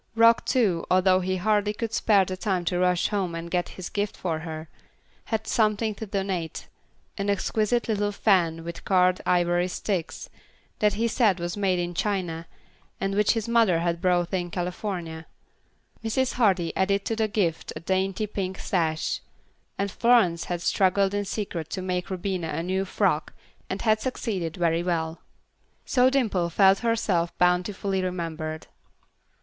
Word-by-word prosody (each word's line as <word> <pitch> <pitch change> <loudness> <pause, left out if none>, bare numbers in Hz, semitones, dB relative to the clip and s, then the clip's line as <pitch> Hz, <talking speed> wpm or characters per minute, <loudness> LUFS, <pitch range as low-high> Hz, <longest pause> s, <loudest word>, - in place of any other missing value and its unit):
Rock, 230 +1 +5
too, 200 -10 +2
although 185 0 +4
he 185 0 -1
hardly 210 +2 +1
could 225 +1 -4
spare 200 -3 +4
the 185 - -4
time 185 -2 -1
to 175 +1 0
rush 180 -1 +2
home 190 -5 -1
and 165 0 -6
get 175 -1 0
his 185 - -5
gift 205 0 -2
for 165 -3 -2
her, 160 -1 -6 0.6
had 220 -1 -2
something 215 0 +1
to 220 +2 -7
donate; 190 -4 -3 0.5
an 200 +1 -1
exquisite 215 +3 0
little 205 -2 0
fan 175 -6 +2
with 170 0 -7
carved 185 -1 +3
ivory 175 0 +2
sticks, 185 -2 -3 0.5
that 210 -1 +3
he 230 +2 +1
said 215 -5 +2
was 175 0 -3
made 195 -3 +1
in 175 0 -2
China, 175 -4 -2 0.5
and 195 0 -1
which 210 +1 +3
his 225 -1 -2
mother 230 -7 +4
had 170 0 -1
bought 175 0 +1
in 175 -2 -1
California. 175 -2 -4 0.8
Mrs. 255 +3 0
Hardy 190 -8 +2
added 200 +1 +1
to 225 - -1
the 220 -1 +1
gift 190 -6 -1
a - - -5
dainty 190 +4 0
pink 190 -2 -4
sash, 160 -4 -1 0.6
and 200 0 -1
Florence 225 -9 +3
had 175 -1 -3
struggled 195 +1 +2
in 205 0 -1
secret 190 -6 -4
to 190 - -4
make 180 -1 -2
Rubina 185 -2 -2
a 160 +1 -3
new 190 +2 -1
frock, 185 -5 0 0.4
and 190 - -3
had 215 -1 +3
succeeded 195 -10 -3
very 170 -1 +1
well. 165 -2 -2 0.6
So 255 0 +4
Dimple 220 -10 +1
felt 195 +3 +5
herself 205 -7 0
bountifully 185 +2 +1
remembered. 160 -3 -4
185 Hz, 160 wpm, -26 LUFS, 175-210 Hz, 0.8 s, Rock